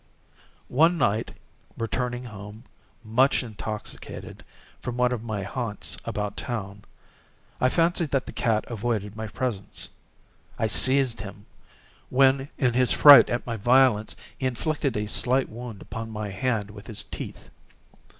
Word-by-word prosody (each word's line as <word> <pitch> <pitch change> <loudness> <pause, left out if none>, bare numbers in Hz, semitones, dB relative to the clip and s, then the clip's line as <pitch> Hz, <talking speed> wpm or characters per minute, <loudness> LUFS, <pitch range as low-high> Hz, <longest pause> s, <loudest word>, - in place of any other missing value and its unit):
One 165 +7 +3
night, 110 -5 +1 0.5
returning 120 +2 -2
home, 105 -1 -10 0.4
much 130 +5 +2
intoxicated, 110 -2 -7 0.4
from 125 -1 -4
one 125 0 +3
of 120 -3 -2
my 110 -4 -3
haunts 105 +1 -3
about 105 -1 -3
town, 100 -4 -5 0.7
I 125 - +3
fancied 170 +1 +1
that 135 -2 0
the - - -7
cat 110 -2 0
avoided 110 -3 -3
my 110 0 -5
presence. 105 -3 -4 0.7
I - - 0
seized 130 +3 +4
him; 100 0 -9 0.6
when, 135 +1 +3
in 125 -3 +2
his 125 0 +2
fright 145 -2 +9
at 120 - -2
my 115 -2 -3
violence, 120 -1 +3 0.2
he 130 - 0
inflicted 135 0 -1
a 105 - -1
slight 130 +5 +2
wound 115 -2 -8
upon 115 0 -6
my 105 -2 -5
hand 105 -1 -1
with 105 0 -12
his 110 - -3
teeth. - - -8
115 Hz, 140 wpm, -26 LUFS, 105-130 Hz, 0.7 s, fright